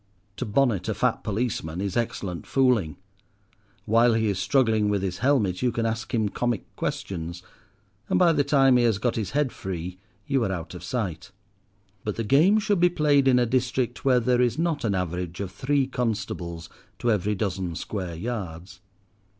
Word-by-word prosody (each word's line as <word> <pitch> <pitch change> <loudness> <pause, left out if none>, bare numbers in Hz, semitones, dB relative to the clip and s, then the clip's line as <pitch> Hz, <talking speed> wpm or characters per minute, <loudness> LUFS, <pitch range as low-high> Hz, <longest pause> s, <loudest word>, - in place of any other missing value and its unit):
To - - -3
bonnet 115 -2 +1
a - - -1
fat - - 0
policeman 100 -7 -2
is 100 -1 -2
excellent 95 -8 -3
fooling. 125 - +2 0.9
While 115 +1 +4
he 110 -1 +1
is 95 -2 -1
struggling 110 0 +2
with 100 -2 0
his 90 -2 -3
helmet 115 -9 +1
you 125 - +2
can 115 -1 -1
ask 115 0 -3
him 110 -4 +1
comic 120 0 -2
questions, 85 -1 -4 0.7
and - - +2
by 175 -2 +5
the 145 - +2
time 135 -3 +4
he 120 - +3
has 110 -4 +2
got 120 +3 -1
his 110 -4 -2
head 145 -4 +1
free 90 -1 -6 0.3
you 135 -3 +1
are 100 - -1
out 85 -3 -5
of 90 -1 -9
sight. 90 -5 -3 0.7
But 105 - -3
the 115 - -2
game 155 - +4
should 210 -3 +1
be 175 +1 +5
played 145 -5 +3
in 130 -1 +5
a 125 - +3
district 125 0 -1
where 130 -2 +4
there 125 +1 +2
is 125 +1 +1
not 165 -2 0
an 105 -4 +1
average 90 -1 -3
of 100 -2 -4
three 135 +6 +1
constables 105 -9 -3 0.3
to 120 - +1
every 105 0 0
dozen 95 -4 -2
square 90 -2 -4
yards. 90 -4 -6
110 Hz, 180 wpm, -25 LUFS, 95-125 Hz, 0.9 s, by